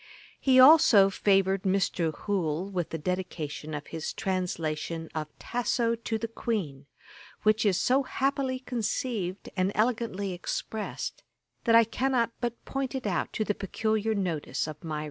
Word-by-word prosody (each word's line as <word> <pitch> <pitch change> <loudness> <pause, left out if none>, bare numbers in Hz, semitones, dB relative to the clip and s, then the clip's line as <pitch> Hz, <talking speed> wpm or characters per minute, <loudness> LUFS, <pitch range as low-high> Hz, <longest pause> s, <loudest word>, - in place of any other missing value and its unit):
He 260 -1 +4
also 255 -9 +8
favoured 195 -1 +2
Mr. 185 -4 +1
Hoole 180 -3 -1
with 180 -4 -2
the 165 - -3
Dedication 155 -3 -4
of 150 - -5
his 160 -1 -5
translation 165 -3 -2
of 155 -1 -3
Tasso 235 -1 0
to 230 -1 -3
the 230 +1 -3
Queen,[*] 180 - -3 0.6
which 215 0 +3
is 190 -3 +2
so 265 +2 +3
happily 270 0 -1
conceived 230 -6 -3
and 185 0 +1
elegantly 215 -4 0
expressed, 210 +4 -4 0.4
that 230 -2 +5
I 230 - +8
cannot 235 +1 0
but 240 -1 -3
point 270 0 -3
it 260 - -4
out 180 -5 -1
to 220 - 0
the 210 - 0
peculiar 220 +2 -1
notice 165 -9 -2
of 155 +1 -8
my 155 -2 -3
readers. - - -2
200 Hz, 150 wpm, -28 LUFS, 175-235 Hz, 0.6 s, also